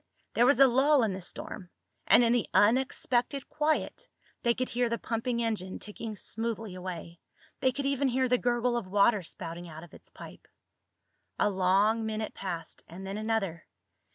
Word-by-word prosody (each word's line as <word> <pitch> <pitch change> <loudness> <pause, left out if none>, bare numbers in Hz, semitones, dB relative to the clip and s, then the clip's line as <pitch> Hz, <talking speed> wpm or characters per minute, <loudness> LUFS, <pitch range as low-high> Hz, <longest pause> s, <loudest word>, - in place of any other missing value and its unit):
There 240 +2 +4
was 280 -2 +4
a 275 - +9
lull 270 +2 +4
in 210 -3 0
the 190 - -6
storm, 180 +1 -5 0.4
and 245 - +7
in 235 0 +3
the 240 -3 0
unexpected 250 +3 +2
quiet 310 +11 -1 0.3
they 235 -1 +2
could 255 0 -2
hear 245 0 0
the 235 - -1
pumping 235 +1 -2
engine 205 -5 -2
ticking 215 +1 -7
smoothly 225 0 -3
away. 175 -2 -7 0.4
They 260 -1 +2
could 280 +2 -4
even 275 0 +1
hear 260 +1 +1
the 250 0 +2
gurgle 240 0 +1
of 225 -6 -4
water 200 +2 +3
spouting 170 0 -7
out 160 +1 -9
of 175 - -15
its - - -13
pipe. - - -12 0.9
A 210 - +2
long 195 +4 +2
minute 220 0 -3
passed, 170 -4 -5
and 185 +3 -9
then 195 +2 -4
another. 215 -7 -2
225 Hz, 175 wpm, -29 LUFS, 190-245 Hz, 0.9 s, a